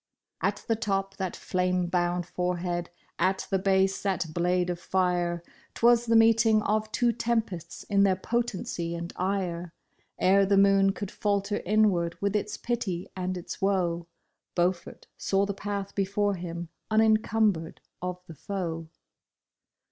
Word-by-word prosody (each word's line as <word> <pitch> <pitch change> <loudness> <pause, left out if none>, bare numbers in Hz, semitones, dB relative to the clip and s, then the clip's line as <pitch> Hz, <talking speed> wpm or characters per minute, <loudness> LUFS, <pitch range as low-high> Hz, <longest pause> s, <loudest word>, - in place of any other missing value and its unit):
At - - -1
the 225 - +2
top 195 -2 -2
that 190 -2 -3
flame 180 0 0
bound 175 0 0
forehead, 175 -1 -2 0.3
at 190 +2 +1
the 195 - +2
base 190 0 +2
that 185 -5 -1
blade 180 +1 +1
of 175 - -5
fire 175 -2 0
— - - -30
'Twas 235 0 +4
the 230 - +3
meeting 225 -1 +5
of 215 +1 0
two 240 +1 +2
tempests 225 -7 -2
in 200 -1 +2
their 195 -2 +4
potency 190 -5 -2
and 170 +1 -6
ire. 180 -3 -2 0.4
Ere 195 +1 +4
the 200 0 +3
moon 195 0 +5
could 195 0 -6
falter 205 0 -1
inward 195 -5 +2
with 200 0 0
its 210 0 -1
pity 200 -7 -3
and 185 0 -2
its 175 - -6
vv^oe, 175 -4 0 0.5
Beaufort 175 0 -1
saw 195 +1 +1
the 200 - -2
path 200 0 -4
before 200 +1 +1
him 170 -2 -5 0.2
unencumbered 215 -5 +2 0.2
of 180 0 -4
the 165 - -10
foe. 165 -1 -4
190 Hz, 145 wpm, -28 LUFS, 175-205 Hz, 0.5 s, meeting